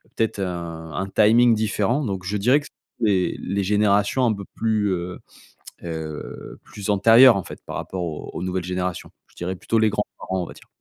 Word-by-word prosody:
Peut-être 110 -2 -1
un 85 -3 -5
un 95 +1 -2
timing 115 +4 +5
différent 110 +5 0
donc 95 -4 -3
je 105 +3 -1
dirais 125 +8 +4
que 145 - -11 0.3
c'est 100 -5 +2
les 100 +2 -2
générations 105 +4 +2
un 115 - +3
peu 100 -2 -7
plus, 110 -2 +1
heu 90 0 -4 0.7
heu 80 -2 -6
plus 105 0 -5
antérieures 115 +4 +7
en 95 - -1
fait, - - -10
par - - -6
rapport 95 -1 -4
aux 80 -3 -6
aux - - -5
nouvelles 90 -1 -2
générations. 90 -1 -3 0.2
Je - - -26
dirais 90 +1 -4
plutôt 115 +5 0
les 110 -1 +3
grands-parents, 95 -3 -3
on - - -8
va - - -10
dire. - - -17
100 Hz, 195 wpm, -23 LUFS, 90-110 Hz, 0.7 s, antérieures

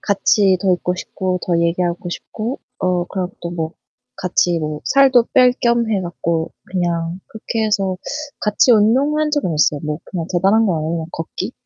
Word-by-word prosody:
같이 200 -1 +3
더 190 -2 +3
있고 180 0 -1
싶고 185 0 -3
더 175 -2 +2
얘기하고 175 +1 0
싶고 220 +8 -5 0.2
어 180 -1 0
그리고 185 -1 -4
또 170 - -4
뭐 165 -2 -3 0.4
같이 175 -1 +1
뭐 150 -1 -4
살도 265 -3 +5
뺄 250 -1 +6
겸 235 -1 +2
해 205 -3 +1
갖고 170 -2 -2
그냥 175 -1 -2
그렇게 220 0 -3
해서 195 -3 0 0.4
같이 210 +4 +3
운동한 275 +8 +3
적은 285 - 0
있어요. 150 -1 +2
뭐 150 -1 -3
그냥 170 -4 -5
대단한 195 +5 +3
건 180 - +1
아니고 155 +1 -2
그냥 160 -1 -4
걷기. 165 - -5
185 Hz, 315 characters per minute, -19 LUFS, 170-220 Hz, 0.4 s, 뺄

